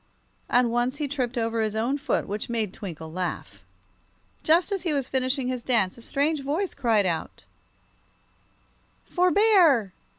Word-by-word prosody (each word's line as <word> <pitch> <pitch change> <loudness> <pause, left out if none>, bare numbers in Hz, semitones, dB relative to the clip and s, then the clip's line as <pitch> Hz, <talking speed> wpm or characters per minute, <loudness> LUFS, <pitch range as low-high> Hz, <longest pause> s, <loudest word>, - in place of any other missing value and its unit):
And 245 -1 +3
once 240 +3 0
he 295 -1 -2
tripped 260 -3 -3
over 230 -1 0
his 215 -1 -1
own 245 +6 0
foot, 280 - -1
which 205 +3 -4
made 220 -5 -2
Twinkle 160 -6 -8
laugh. 180 +1 -5 0.8
Just 340 +6 +3
as 390 -2 -1
he 335 -4 -1
was 275 -3 -1
finishing 260 0 -1
his 255 -1 -2
dance 225 -7 +1
a 235 - -12
strange 285 +5 0
voice 315 +8 -2
cried 220 -5 +2
out: 170 -3 -3 1.6
"For 360 0 +2
bear!" 345 - +4
250 Hz, 155 wpm, -25 LUFS, 220-290 Hz, 1.6 s, bear